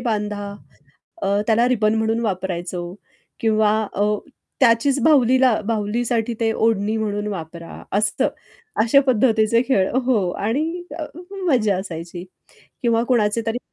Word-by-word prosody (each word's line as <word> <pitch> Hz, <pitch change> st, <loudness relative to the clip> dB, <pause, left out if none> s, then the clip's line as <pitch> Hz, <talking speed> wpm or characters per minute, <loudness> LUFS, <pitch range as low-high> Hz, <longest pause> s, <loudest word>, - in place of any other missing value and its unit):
बांधा. 205 Hz, -3 st, -3 dB, 0.7 s
अ, 200 Hz, +1 st, +1 dB
त्याला 230 Hz, +2 st, +3 dB
रिबन 220 Hz, -3 st, +2 dB
म्हणून 225 Hz, +1 st, 0 dB
वापरायचो 180 Hz, -2 st, -3 dB, 0.6 s
किंवा 215 Hz, -2 st, +3 dB, 0.2 s
अ, 205 Hz, -, 0 dB, 0.6 s
त्याचीच 260 Hz, +3 st, +4 dB
बाहुलीला 260 Hz, -5 st, +4 dB
बाहुलीसाठी 230 Hz, +1 st, -1 dB
ते 225 Hz, -, +2 dB
ओढणी 220 Hz, -1 st, +1 dB
म्हणून 210 Hz, -1 st, -2 dB
वापरा 170 Hz, -1 st, -8 dB, 0.2 s
असतं 210 Hz, -, +1 dB, 0.5 s
अशा 235 Hz, +5 st, +5 dB
पद्धतीचे 230 Hz, -1 st, +3 dB
खेळ 195 Hz, -8 st, +3 dB, 0.2 s
हो. 215 Hz, -8 st, +2 dB
आणि 310 Hz, -, -2 dB, 0.2 s
अ, 310 Hz, -, -3 dB, 0.4 s
मजा 215 Hz, -, +2 dB
असायची 175 Hz, -1 st, -7 dB, 0.6 s
किंवा 230 Hz, -1 st, +2 dB
कुणाचे 230 Hz, -2 st, +2 dB
तरी 225 Hz, +2 st, -1 dB
220 Hz, 120 wpm, -21 LUFS, 205-235 Hz, 0.7 s, अशा